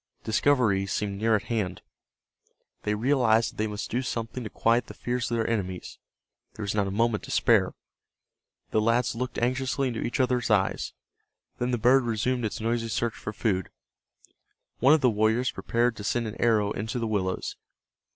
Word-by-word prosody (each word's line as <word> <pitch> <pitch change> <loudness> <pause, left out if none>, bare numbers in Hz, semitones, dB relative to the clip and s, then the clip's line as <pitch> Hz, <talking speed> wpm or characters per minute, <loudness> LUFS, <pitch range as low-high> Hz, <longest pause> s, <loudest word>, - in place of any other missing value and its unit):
Discovery 110 -5 +2
seemed 100 0 -2
near 110 +1 +3
at 105 - -1
hand. 105 -6 -2 1.0
They 105 0 0
realized 115 -1 +3
that - - -22
they 110 - 0
must 105 -1 -5
do 125 - 0
something 120 -1 -4
to 110 - -5
quiet 115 +3 +1
the - - -10
fears 125 +1 -2
of 120 - 0
their 115 - 0
enemies. 95 -6 -3 0.6
There 110 - -6
was 100 - -1
not 100 -2 +1
a - - -2
moment 110 +2 +1
to - - -12
spare. - - +3 1.0
The 110 - +2
lads 115 +2 +2
looked 125 +2 -4
anxiously 130 +2 0
into 115 - -4
each 125 - -2
other's 125 -2 +1
eyes. 100 -3 +1 0.7
Then 125 - 0
the 125 - +1
bird 125 +4 +5
resumed 120 +1 0
its 105 - -3
noisy 115 +1 -1
search 115 +2 -1
for - - -6
food. 100 -4 -1 1.1
One 135 +5 +6
of 155 - 0
the 125 -3 +4
warriors 110 +4 +2
prepared 120 0 0
to 105 - -7
send 115 +3 0
an 110 0 -6
arrow 110 -3 +3
into 110 +4 -3
the 115 - -1
willows. 95 -4 -2
115 Hz, 180 wpm, -27 LUFS, 105-125 Hz, 1.1 s, One